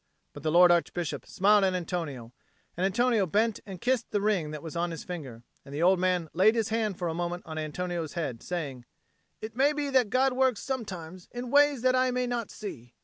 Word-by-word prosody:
But 145 - -9
the 155 - -1
lord 175 +1 +7
Archbishop 170 -5 -1
smiled 205 +1 +4
at 190 -1 +2
Antonio, 155 -9 -4 0.4
and 185 +2 +1
Antonio 225 0 +2
bent 215 +5 +1
and 190 -3 -7
kissed 245 +1 0
the 205 - 0
ring 200 -7 +1
that 150 -1 -7
was 160 -1 -7
on 170 +1 0
his 165 -2 -6
finger; 135 -10 -7 0.2
and 140 - -9
the 155 - 0
old 185 +1 +5
man 180 -2 +1
laid 205 +6 +4
his 225 -3 0
hand 215 -4 -1
for 175 - -2
a 165 - -1
moment 175 +1 -3
on 160 -1 -5
Antonio's 165 +1 -3
head, 140 -9 -3
saying, 140 -9 -5 0.6
"It 220 +1 -7
may 280 +4 +3
be 290 -1 -2
that 255 -5 +3
God 260 +3 +2
works 255 -3 +2
sometimes 185 -9 -5
in 245 0 -6
ways 285 -3 +4
that 255 0 +4
I 255 0 +3
may 250 0 0
not 240 -2 -3
see." 125 - -9
185 Hz, 215 wpm, -28 LUFS, 165-235 Hz, 0.6 s, lord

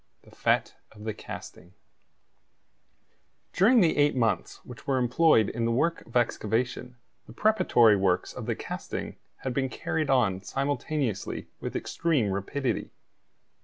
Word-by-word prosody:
THE - - -18
FETE - - +1 0.2
OF 105 0 -13
THE 110 0 -3
CASTING 90 -2 -10 1.8
During 225 +6 +5
the 165 -3 +3
eight 145 -1 +3
months 115 -3 0
which 120 -3 -12
were 135 -1 +2
employed 125 -2 +4
in 115 0 -2
the 115 - +1
work 165 +8 +1
of 115 - -1
excavation 120 +2 -1 0.3
the - - -11
preparatory 120 - +4
works 95 -2 +1
of - - -7
the - - 0
casting - - -6 0.3
had 130 - -2
been 130 0 0
carried 155 +3 -2
on 110 -8 +2
simultaneously 135 -1 -2
with - - -5
extreme 145 -12 0
rapidity. 120 +8 -2
125 Hz, 135 wpm, -27 LUFS, 110-145 Hz, 1.8 s, During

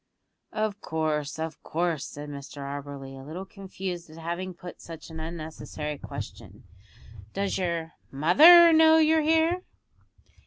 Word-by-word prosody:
"Of 215 -1 -2
course, 155 -2 -2
of 160 -1 -5
course," 165 -3 -2
said 145 +1 -8
Mr 140 0 -9
Auberly, 140 -1 -7
a 135 0 -10
little 165 +7 -7
confused 190 -3 -7
at 155 - -13
having 170 +3 -5
put 175 +1 -10
such 165 -1 -10
an 160 - -7
unnecessary 155 -2 -6
question. - - -9 0.7
"Does 200 -1 -1
your 170 -3 -2 0.2
mother 325 - +8
know 320 0 +7
you're 320 0 +4
here?" 325 +3 +2
170 Hz, 130 wpm, -27 LUFS, 150-200 Hz, 0.7 s, mother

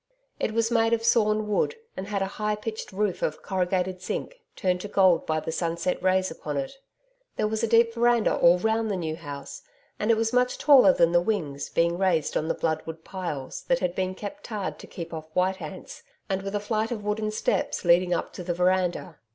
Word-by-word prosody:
It 220 - -1
was 230 0 +1
made 225 -1 +3
of 225 -1 +1
sawn 215 -2 +3
wood 210 - +1 0.2
and 190 - -5
had 200 -2 -1
a 195 +2 -6
high 210 0 +1
pitched 220 +1 -6
roof 195 -1 -1
of 155 - -2
corrugated 185 -1 -1
zinc, - - -5
turned 180 -1 0
to 205 - -5
gold 190 -4 +3
by 155 0 +1
the 160 - -4
sunset 170 +2 -1
rays 185 -1 +2
upon 150 -2 -5
it. 135 -1 -2 0.6
There 215 - 0
was 220 0 -2
a 230 - +1
deep 230 +1 +4
veranda 235 -1 +3
all 170 +1 +5
round 220 +3 0
the 200 - 0
New 160 -3 -3
House, 145 -4 -8 0.4
and 210 - -1
it 230 - +5
was 225 +1 0
much 250 0 +2
taller 285 -1 +7
than 170 -10 +3
the 175 0 +4
wings, 155 -9 -2
being 170 +1 +1
raised 175 -6 +1
on 160 +1 0
blood 160 -1 -1
wood 160 0 -7
piles, 160 -9 -5
that 260 - +3
had 180 -8 -1
been 185 0 -2
tarred 210 -2 -5
to - - -11
keep 170 -1 -7
off 155 -1 -7
white 185 +1 +1
ants, 165 +4 -8 0.3
and 190 0 0
with 195 +1 -4
a - - +1
flight 215 +1 -1
of 220 -4 -4
wooden 210 +1 -1
steps 215 -3 -1
leading 175 +1 +4
up 175 - -1
to 180 - -7
the 175 -1 -2
veranda. 180 -2 0
190 Hz, 215 wpm, -26 LUFS, 170-220 Hz, 0.6 s, taller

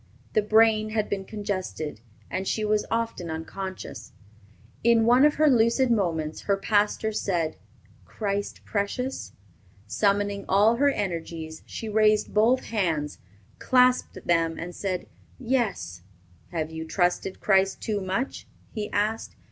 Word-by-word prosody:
The 215 - +4
brain 215 0 +4
had 215 -1 -1
been 195 -1 -2
congested, 185 - -4 0.3
and 190 - -2
she 215 - 0
was 210 0 +1
often 230 -7 -2
unconscious. 185 +4 -6 0.7
In 230 -1 +4
one 245 +4 +6
of 300 - +3
her 305 0 +4
lucid 240 0 +4
moments, 165 -8 0
her 200 - +4
pastor 210 +2 +1
said, 175 -6 -1 0.5
"Christ 200 -1 -3
precious?" 235 +5 -3 0.5
Summoning 200 -1 0
all 210 +4 +4
her 285 +2 +4
energies, 165 - -4
she 225 - -6
raised 215 0 +3
both 230 +5 +3
hands, 165 -9 -1 0.4
clasped 250 0 +2
them, 165 -1 +2
and 175 +1 -6
said, 185 -2 -3 0.3
"Yes." 225 - -1 0.5
"Have 160 -2 -3
you 160 0 -5
trusted 180 +3 0
Christ 195 -1 +2
too 210 -2 -2
much?" 195 +8 -3 0.2
he 215 -3 -4
asked. 215 +2 -1
205 Hz, 130 wpm, -26 LUFS, 180-225 Hz, 0.7 s, one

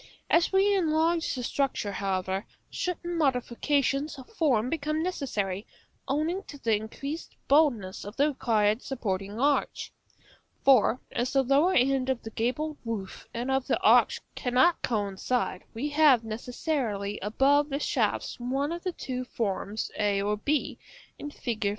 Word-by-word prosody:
As 335 0 +4
we 395 +1 +4
enlarge 330 -2 +1
the 250 - -4
structure, 250 -5 -1
however, 190 0 -2 0.2
certain 345 -1 -3
modifications 275 +2 0
of 260 - -11
form 270 - +2
become 305 +2 -1
necessary, 210 - -2 0.4
owing 310 +7 0
to 290 - -10
the 230 -5 +1
increased 275 +9 -6
boldness 265 -11 +2
of 205 +2 -8
the 285 +2 +3
required 220 -5 +1
supporting 205 -5 -3
arch. 285 +2 0 0.7
For, 255 -2 +5
as 245 +2 -1
the 270 -1 +4
lower 285 +8 +3
end 265 0 +2
of 260 -2 -1
the 225 - -7
gabled 290 +8 -2
roof 220 -5 -5
and 240 +3 -3
of 265 -1 0
the - - +1
arch - - +5
cannot 260 +7 +2
coincide, 205 -1 -1
we 265 +7 -3
have 290 -5 +5
necessarily 225 -2 -3
above 280 +8 +2
the 275 - -1
shafts - - -1
one 270 +5 -1
of 340 0 -4
the 365 -1 -3
two 255 -5 -4
forms 215 -3 -3
a 205 -1 +2
or 205 +1 0
b, 290 +8 -1 0.4
in 290 - -5
Fig. 230 -7 -2
255 Hz, 145 wpm, -28 LUFS, 215-295 Hz, 0.7 s, For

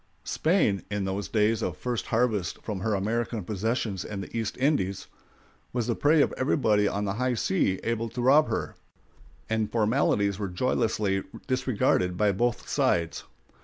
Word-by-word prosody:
] - - -39
Spain, 155 - +1
in 105 -1 -2
those 95 +1 -3
days 110 0 +2
of - - -2
first 125 -2 -3
harvest 110 -7 0
from 105 -4 -4
her 105 +2 0
American 110 +2 -1
possessions 105 0 -2
and 100 -2 -5
the - - -10
East 110 -2 -2
Indies, 130 - 0 0.7
was 120 -2 0
the 120 - 0
prey 145 +4 +4
of - - -1
everybody 110 -7 +2
on 100 +1 -1
the 100 - -1
high 125 -1 +1
seas 95 -3 +1
able 115 0 -1
to 125 - -7
rob 145 +5 +5
her, - - -2 0.7
and 110 -1 -1
formalities 105 -3 +1
were 100 -2 -2
joyously 105 -1 0 0.2
disregarded 125 -8 +1
by 105 0 +3
both 120 +4 -1
sides. 85 -1 0
110 Hz, 165 wpm, -27 LUFS, 100-120 Hz, 0.7 s, rob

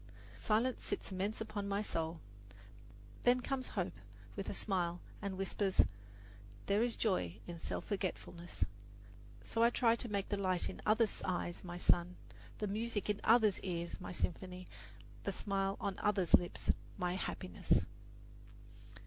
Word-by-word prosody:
Silence 230 +4 +1
sits - - -3
immense 195 +3 -1
upon 215 -2 -3
my 200 0 +1
soul. 165 -5 -1 1.0
Then 245 +1 +5
comes 260 +1 -2
hope - - 0 0.4
with - - -3
a - - -2
smile 175 -4 0 0.2
and 200 -2 -3
whispers, 195 0 +3 0.8
"There 200 +2 +3
is 240 0 +2
joy 140 - +1
in 170 -1 -6
self - - -3
forgetfulness." 180 -3 -2 0.8
So 230 - -1
I 235 - +7
try 235 -1 +4
to 235 - -2
make 200 -1 -1
the 205 - 0
light 185 -2 +2
in - - -7
others' 220 0 +3
eyes 175 -1 -2
my 175 -1 -5
sun, 175 0 +3 0.4
the 210 - -1
music 210 0 0
in 205 - -4
others' 220 -3 +5
ears 170 -1 -3
my - - -5
symphony, 180 +1 -3 0.6
the - - 0
smile 195 -1 0
on 200 -2 -2
others' 200 -5 +1
lips 175 - +5 0.3
my 180 -2 0
happiness. 90 - 0
195 Hz, 145 wpm, -36 LUFS, 180-215 Hz, 1.0 s, I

